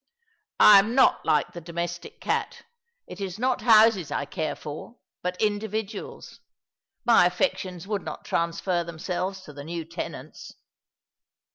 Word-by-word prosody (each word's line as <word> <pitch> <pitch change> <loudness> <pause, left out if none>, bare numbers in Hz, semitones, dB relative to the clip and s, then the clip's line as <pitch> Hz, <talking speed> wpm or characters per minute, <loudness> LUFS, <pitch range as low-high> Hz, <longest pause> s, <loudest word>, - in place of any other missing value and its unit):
" 430 0 -51
I 205 -1 +9
am 220 +5 0
not 270 - +4
like 150 -2 +2
the 175 - -7
domestic 175 - -5
cat. - - -2 0.4
It 180 +2 -10
is 190 -1 -4
not 255 +2 0
houses 215 - +5
I 140 - -2
care 155 +2 -3
for, 155 +10 -9 0.2
but 180 0 -3
individuals. 215 0 -3 0.7
My 230 -7 +6
affections 180 -2 -2
would 205 -1 -2
not - - -8
transfer 170 +1 -1
them 170 -1 -9
selves 185 +2 -3
to 150 -5 -12
the 140 0 -9
new 165 +1 -5
tenants." 170 +2 -8
185 Hz, 145 wpm, -26 LUFS, 170-215 Hz, 0.7 s, I